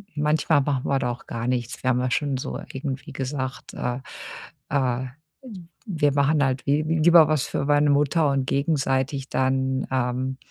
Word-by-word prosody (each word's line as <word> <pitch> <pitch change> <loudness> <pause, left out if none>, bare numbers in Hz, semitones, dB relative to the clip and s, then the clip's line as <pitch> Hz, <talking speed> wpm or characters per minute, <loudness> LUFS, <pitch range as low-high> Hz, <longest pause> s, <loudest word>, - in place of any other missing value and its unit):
manchmal 150 0 +2
machen 135 -2 -1
wir 135 -1 +1
da 125 -2 -1
auch 120 - -9
gar 115 +1 -4
nichts. 125 +2 -2
Wir 130 - +2
haben 125 -1 +2
ja 125 0 -1
schon 140 -2 0
so 130 - -4 0.2
irgendwie 135 +3 -5
gesagt, 130 -1 -4
äh, 125 +1 -3 0.7
äh, 130 -2 0 0.4
w 225 -8 -10 0.2
wir 155 - +1
machen 145 +1 +3
halt 130 -1 -1
wi 145 +2 +3
lieber 160 +1 +5
was 155 -3 +1
für 140 - -2
meine 145 0 +3
Mutter 145 +2 +3
und 135 -1 0
gegenseitig 140 -2 0
dann, 130 0 0
ähm, 130 +1 -1
140 Hz, 170 wpm, -24 LUFS, 130-150 Hz, 0.7 s, lieber